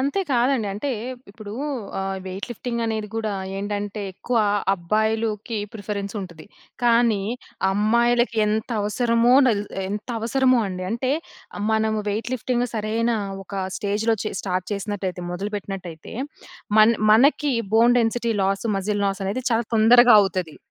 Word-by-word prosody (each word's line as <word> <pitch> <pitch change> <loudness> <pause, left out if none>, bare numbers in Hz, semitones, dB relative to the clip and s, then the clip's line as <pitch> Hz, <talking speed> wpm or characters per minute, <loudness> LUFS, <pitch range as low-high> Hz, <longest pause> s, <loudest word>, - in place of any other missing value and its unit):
అంతే 280 +9 0
కాదండి. 245 -2 +2
అంటే 275 +7 -3 0.4
ఇప్పుడు 210 -1 -10 0.5
ఆహ్, 195 0 -2
వెయిట్ 190 +2 -5
లిఫ్టింగ్ 235 0 -3
అనేది 220 -1 -2
కూడా 220 -2 -2 0.2
ఏంటంటే, 205 +1 -3
ఎక్కువ 240 +6 -3 0.4
అబ్బాయిలుకి 220 +4 -1 0.2
ప్రిఫరెన్స్ 200 -1 -5
ఉంటది. 170 -4 -10 0.4
కానీ 235 -3 +4 0.5
అమ్మాయిలకి 235 +3 +2
ఎంత 215 +2 -1
అవసరమో 235 +3 +3
నలత్ 210 -4 0 0.2
ఎంత 210 +4 -5
అవసరమో 255 +2 +3
అండి. 185 0 -5
అంటే 245 +4 -1 0.6
మనము 220 0 +1
వెయిట్ 215 +4 -2
లిఫ్టింగ్ 245 0 -1
సరైన 225 +2 0 0.3
ఒక 195 0 -4
స్టేజ్‌లో 215 +2 0
చే - - -2
స్టార్ట్ 185 -1 -2
చేసినట్లయితే 200 -2 -3
మొదలు 195 +4 -4
పెట్టినట్లయితే, 185 -5 -7 0.6
మన్ 215 +2 +7 0.2
మనకి 280 +4 +4 0.2
bone 235 +2 +5
density 235 0 0
loss 195 +3 0
,muscle 205 +1 -1
loss 195 0 -2
అనేది 230 +7 -2
చాలా 230 0 +2
తొందరగా 240 +2 +7
అవుతది. 180 -4 -3
215 Hz, 130 wpm, -23 LUFS, 200-235 Hz, 0.6 s, మన్